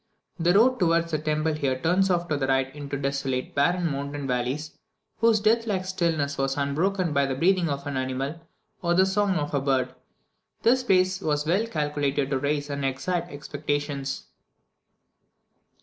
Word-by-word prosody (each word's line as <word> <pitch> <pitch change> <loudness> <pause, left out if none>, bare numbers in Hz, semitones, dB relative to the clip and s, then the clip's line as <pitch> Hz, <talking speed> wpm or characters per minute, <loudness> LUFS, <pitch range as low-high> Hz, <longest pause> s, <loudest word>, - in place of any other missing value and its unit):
The 175 +2 +3
road 250 +5 +5
towards 170 -2 +2
the 155 - 0
temples 155 0 -1
here 130 -3 0
turns 180 +7 +2
off 175 -1 +1
to 155 - +1
the 135 -2 -1
right 135 0 +1
into 145 -1 -5
desolate, 135 -2 -2
barren 175 +5 +2
mountain 140 0 -4
valleys, 130 +4 -2 0.5
whose 230 -1 +4
death 225 +2 +2
like 190 -3 -1
stillness 165 -7 -1
was 135 0 0
unbroken 165 +5 0
by 140 -1 +2
the 135 - -2
breathing 175 +3 +2
of 140 -1 -3
an 145 -2 -3
animal, 130 +5 -3 0.4
or 175 -1 +1
the 190 +1 +5
song 195 0 +1
of 150 -3 -2
a 140 - +1
bird. 130 -2 0 0.7
This 250 +3 +4
place 185 -3 +2
was 150 -3 0
well 190 +8 +1
calculated 145 -5 -1
to 135 - +1
raise 145 +1 -1
and 140 0 -3
excite 135 +7 -1
expectations. 145 -1 -3
150 Hz, 165 wpm, -26 LUFS, 140-180 Hz, 0.7 s, road